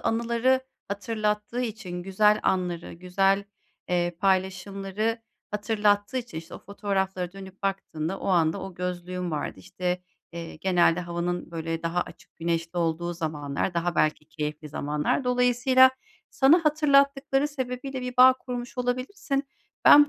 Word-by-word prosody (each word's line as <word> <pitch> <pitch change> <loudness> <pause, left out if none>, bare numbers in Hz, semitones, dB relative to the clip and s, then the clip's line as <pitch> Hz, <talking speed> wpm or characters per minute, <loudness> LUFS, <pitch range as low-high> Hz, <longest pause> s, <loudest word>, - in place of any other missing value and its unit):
anıları 235 +3 +2 0.3
hatırlattığı 210 +2 -1
için 205 -7 -4
güzel 210 +3 +3
anları, 180 -2 -1
güzel, 195 +3 +1 0.4
eee, 175 -1 0
paylaşımları 195 +3 0 0.3
hatırlattığı 210 +2 +1
için, 240 -10 -4
işte, 165 +2 -10
o - - -7
fotoğraflara 190 -3 -2
dönüp 195 0 -11
baktığında, 195 -3 -2
o - - -5
anda 165 -3 +3
o 190 -2 -7
gözlüğün 180 0 -3
vardı. 150 -10 -3
İşte, 180 - -3 0.3
eee, 170 -2 -7
genelde 175 -1 +3
havanın 175 0 -3
böyle 165 0 -3
daha 170 +1 0
açık - - -9
güneşli 165 +1 -2
olduğu 170 +1 0
zamanlar, 155 0 -2
daha 170 +1 0
belki 155 0 +1
keyifli 150 0 -4
zamanlar. 150 - -1
Dolayısıyla, 250 +1 +5 0.4
sana 310 +5 +5
hatırlattıkları 280 -2 +3
sebebiyle 260 -1 -4
bir 250 0 -5
bağ 255 +1 +9
kurmuş 245 -1 -6
olabilirsin. 260 +3 -1 0.4
Ben 290 0 +9
195 Hz, 130 wpm, -26 LUFS, 175-245 Hz, 0.4 s, bağ